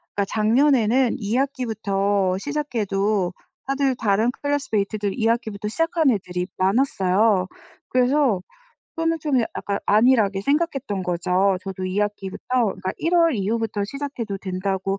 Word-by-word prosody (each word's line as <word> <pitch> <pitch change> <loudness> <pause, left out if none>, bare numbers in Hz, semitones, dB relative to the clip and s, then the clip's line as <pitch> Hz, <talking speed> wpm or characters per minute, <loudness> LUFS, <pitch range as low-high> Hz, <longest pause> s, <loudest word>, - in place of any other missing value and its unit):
그니까 200 - +1
작년에는 240 +2 +3
2 210 +2 -2
학기부터 205 -7 0
시작해도 210 -8 -1 0.3
다들 275 -1 0
다른 220 0 +1
classmate들 215 -8 -1
2 225 -2 +1
학기부터 220 -3 -1
시작한 330 +4 +1
애들이 180 -4 -2
많았어요. 195 -2 +2 0.4
그래서 255 -5 +2 0.5
그거는 330 0 0
좀 280 -4 +1
야 - - +1
약간 200 0 -2
안일하게 215 -3 +4
생각했던 275 - -1
거죠. 180 +2 +1
저도 190 -1 -5
2 185 +2 -2
학기부터 205 -2 -4 0.3
그니까 185 - -4
1 335 +2 0
월 335 -3 +4
이후부터 215 0 -1
시작해도 235 -4 -5
된다고 190 +1 -2
215 Hz, 335 characters per minute, -23 LUFS, 195-265 Hz, 0.5 s, 안일하게